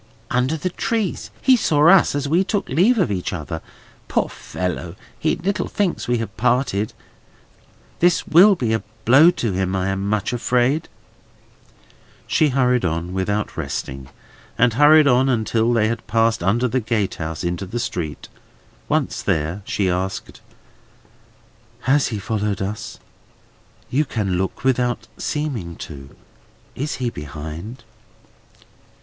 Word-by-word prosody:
"Under 130 +6 +1
the 180 +4 -3
trees. 220 0 -2
He 260 - +6
saw 155 -9 +3
us, 180 -4 +6
as 145 -1 -1
we 170 +6 +3
took 200 +1 -2
leave 190 - +3
of 185 - +1
each 90 -3 -2
other. 80 -2 -5 0.5
Poor - - 0
fellow! 90 -1 -5 0.2
he 155 - +1
little 190 +4 -2
thinks 200 -4 -1
we 120 0 +2
have 110 -4 -5
parted. 120 -3 +1 1.1
This 175 0 +3
will 190 +5 +6
be 120 -9 -1
a 110 - 0 0.2
blow 135 +8 +7
to 120 - -1
him, 95 0 -1
I 95 0 0
am 95 +1 -2
much 105 +2 0
afraid!" 125 +5 +1 1.4
She 155 - +2
hurried 125 -2 +2
on, 85 +1 -2
without 100 +3 -2
resting, 70 -3 -5 0.5
and 120 -1 +3
hurried 150 +4 +6
on 130 0 +4
until 115 -1 +1
they 110 -2 +3
had 115 0 -4
passed 115 -2 +2
under 110 +8 +2
the 130 +2 0
gatehouse 100 -9 -2
into 90 +2 -2
the 120 +6 -4
street; 80 -9 -4 0.6
once - - 0
there, 80 +6 -1
she 100 - 0
asked: 95 +1 -3 1.4
"Has 135 +2 +2
he 110 - -3
followed 105 -1 -2
us? 105 +2 -5 0.9
You 150 +4 +2
can 100 -8 -1
look 95 - -3
without 125 -2 0
seeming 125 - -3
to. 70 -4 -10 0.6
Is 145 +4 -3
he 125 -2 -2
behind?" 75 - -8
115 Hz, 140 wpm, -21 LUFS, 95-140 Hz, 1.4 s, blow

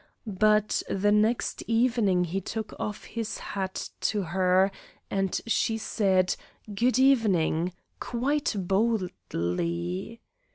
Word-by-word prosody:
But 215 +1 +2
the 205 +2 +2
next 215 +3 +1
evening 225 -6 +2
he 180 +3 -2
took 220 +3 -5
off 210 0 -4
his 230 -2 -4
hat 190 -2 -4
to 210 -2 0
her, 185 +2 +2 0.4
and 195 -1 0
she 225 -1 +1
said 190 -4 +1 0.4
"Good 245 +5 +2
evening," 190 -10 +3 0.3
quite 265 +2 -1
boldly. 180 - -1
200 Hz, 100 wpm, -27 LUFS, 185-225 Hz, 0.4 s, evening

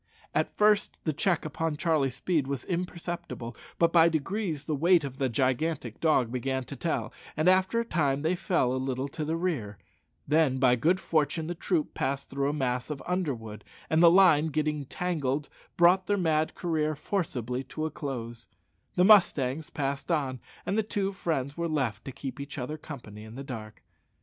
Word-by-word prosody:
At - - -1
first 210 0 +3
the 155 - 0
check 175 +1 +1
upon 160 0 -2
Charlie's 145 -6 +1
speed 155 -2 0
was 140 -2 -3
imperceptible, 175 -8 -4 0.2
but 170 0 +3
by 170 -1 +7
degrees 165 0 -2
the 155 - -1
weight 170 +3 +4
of 135 -2 -6
the 135 -2 +1
gigantic 130 +1 -1
dog 140 -8 +2
began 130 +1 -1
to 140 - -7
tell, 165 +5 -2 0.2
and 155 +3 +2
after 185 +4 +4
a 235 - -1
time 145 -9 +1
they 160 +4 +1
fell 170 -8 +1
a 130 - -1
little 130 0 -2
to 155 - -4
the 160 +2 -1
rear; 140 - -2 0.5
then 150 -3 +3
by 130 -2 +4
good 165 +10 +2
fortune 155 -1 0
the 175 - -3
troop 170 -2 -1
passed 140 +1 -2
through 140 0 0
a - - +1
mass 125 -3 -1
of 150 -2 -5
underwood, 130 - -3 0.3
and 160 +1 +4
the 170 - +9
line 170 -4 +6
getting 155 0 0
entangled 145 -2 -2 0.3
brought 180 +2 +5
their 205 - +2
mad 160 -4 +1
career 155 -3 0
forcibly 135 - -2
to 155 +4 -4
a 160 - -2
close; 120 -5 -6 0.5
the 180 - +4
mustangs 160 -7 +4
passed 140 -2 -3
on, 135 -6 0 0.3
and 200 +3 0
the - - +5
two 205 -2 -1
friends 145 -7 -2
were 170 0 -2
left 125 -9 -1
to 135 - -5
keep 130 0 -7
each 140 +2 -7
other 140 +4 -3
company 120 -9 -9
in 110 +1 -11
the 135 - -6
dark. 110 -5 -8
150 Hz, 185 wpm, -28 LUFS, 130-170 Hz, 0.5 s, the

